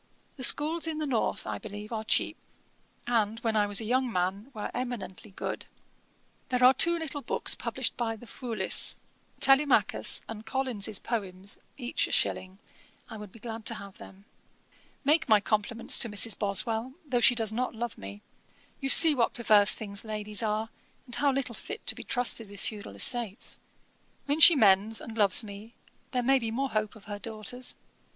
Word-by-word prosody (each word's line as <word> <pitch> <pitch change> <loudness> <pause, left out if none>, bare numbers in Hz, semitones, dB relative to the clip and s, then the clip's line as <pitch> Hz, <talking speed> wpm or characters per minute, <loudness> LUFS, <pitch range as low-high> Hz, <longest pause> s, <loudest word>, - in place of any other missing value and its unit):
The 260 - -6
schools 315 +6 +4
in 320 -1 -3
the 310 - -3
north, 250 -6 -2
I 105 -1 -5
believe, 210 - -9
are 220 -1 -4
cheap; 220 - 0 0.7
and, 225 -2 0
when 225 -2 -1
I 210 -1 +2
was 205 -1 +1
a - - -5
young 255 +2 0
man, 190 +5 -2
were 215 -5 -6
eminently 245 -5 -6
good. 190 - -6 0.8
'There 250 0 0
are 255 +1 +7
two 340 +6 +4
little 305 -3 -5
books - - +1
published - - -3
by 230 -2 -2
the 225 - -14
Foulis, 235 -1 +2 0.4
Telemachus 270 +1 +3
and 220 -1 -8
Collins's 225 -4 -1
Poems, 195 -4 -5 0.2
each 250 -2 -2
a - - -9
shilling: 185 +1 -1 0.5
I 220 - -7
would 210 -2 -10
be - - -15
glad 225 0 -8
to 230 - 0
have 200 -2 -11
them. 195 +1 -14 0.8
'Make 300 -1 +2
my 215 -1 +6
compliments 215 +2 0
to 235 - +2
Mrs. 205 +1 +2
Boswell, 220 +5 0
though 260 -4 0
she 245 +1 +5
does 220 -2 -1
not 250 +1 -3
love 235 +1 -5
me. 100 +1 -11 0.6
You 270 - -3
see 320 +2 +9
what 240 -5 0
perverse 210 -4 +4
things 200 -2 -4
ladies 210 -1 -2
are, 215 0 -2 0.4
and 245 - -12
how 280 +4 +2
little 265 -3 -3
fit 425 - -8
to - - +2
be - - -9
trusted 240 -3 -1
with 200 -1 -10
feudal 205 - -6
estates. 215 - -1 0.7
When 290 +2 -1
she 330 +1 +9
mends 210 -2 +3
and 225 - -9
loves 205 0 +4
me, 210 +3 -11 0.3
there 250 -3 -2
may 270 +2 +3
be 230 -2 -3
more 265 +4 -2
hope 215 +1 -2
of 215 - -15
her 205 -1 -7
daughters. 225 +3 -4
225 Hz, 180 wpm, -28 LUFS, 205-250 Hz, 0.8 s, see